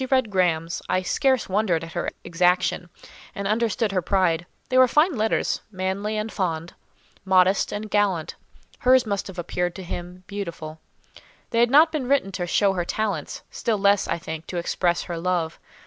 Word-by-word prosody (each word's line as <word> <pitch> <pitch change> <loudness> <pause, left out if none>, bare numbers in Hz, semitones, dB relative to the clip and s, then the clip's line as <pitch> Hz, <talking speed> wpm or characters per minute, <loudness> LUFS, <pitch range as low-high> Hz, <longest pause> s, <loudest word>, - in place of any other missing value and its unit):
As 260 - -2
I - - +6
read 255 -5 +1
Graham's, 170 -3 0
I 185 - +1
scarce 260 +5 +1
wondered 190 -4 +1
at 165 - -8
her - - -2
exaction, 180 +1 +1 0.5
and 200 0 -3
understood 225 0 0
her 185 -2 0
pride: 175 -2 +1 0.2
they 255 - +2
were 255 - +7
fine 300 +6 +3
letters—manly 210 -2 -1
and 215 +1 -3
fond—modest 185 +2 0
and 210 +1 -4
gallant. 200 -6 0 0.5
Hers 255 0 +4
must 200 -2 -2
have 190 -1 -10
appeared 175 0 -2
to 190 - -7
him 180 +1 -7
beautiful. 170 -6 -6 0.7
They 230 - +1
had 240 0 +4
not 310 +5 +6
been 290 -5 -2
written 275 -8 +2
to 180 -2 -3
show 195 +2 +3
her 180 -2 -1
talents; 215 +4 -3
still 225 -2 -1
less, 200 0 +3
I - - -1
think, 160 -1 -7
to 180 - -5
express 175 0 0
her 170 -2 -5
love. 170 -2 -1
190 Hz, 175 wpm, -24 LUFS, 175-215 Hz, 0.7 s, were